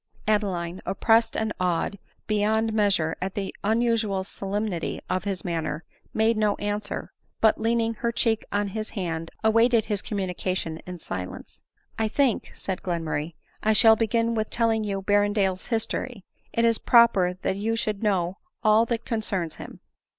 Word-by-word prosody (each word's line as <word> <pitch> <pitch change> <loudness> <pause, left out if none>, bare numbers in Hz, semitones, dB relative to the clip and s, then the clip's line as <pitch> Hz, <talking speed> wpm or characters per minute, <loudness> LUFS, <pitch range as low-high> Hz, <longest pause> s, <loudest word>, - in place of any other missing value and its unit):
Adeline, 190 -5 0
oppressed 225 +4 +2
and 220 -1 -1
awed 180 +2 0 0.3
beyond 220 +1 +1
measure 195 -7 +2
at 190 +1 -3
the 195 -2 -3
unusual 220 -3 +1
solemnity 200 -2 -3
of 185 +1 -1
his 195 -2 -3
manner, 165 -2 -2 0.3
made 220 +1 +2
no 210 -1 +2
answer; 205 0 -4 0.3
but, 220 -1 +4
leaning 230 0 +1
her 235 +1 -1
cheek 225 -1 +1
on 205 0 0
his 215 +2 -4
hand, 165 -5 -3
awaited 230 +1 +4
his 205 -3 -1
communica 185 -2 -2
tion 160 -3 -4
in 180 0 -6
silence. 95 - -7 0.2
" - - -17
I 220 - +2
think," 255 +1 +1
said 190 -2 -4
Glenmurray, 165 -3 -2 0.2
" - - -36
I 220 - +3
shall 220 +1 +7
begin 230 +1 +1
with 220 -1 -1
telling 225 -2 +1
you 195 -2 -3
Berrendale's 205 -2 +1
history: 225 -2 -2 0.3
it 230 - +2
is 230 -1 +3
prpper 195 -7 +4
that 190 - -1
you 225 +3 0
should 215 -3 -2
know 190 -4 0 0.2
all 220 +1 +5
that 230 -1 -2
concerns 195 -8 -1
him." - - -10
205 Hz, 160 wpm, -26 LUFS, 185-225 Hz, 0.3 s, shall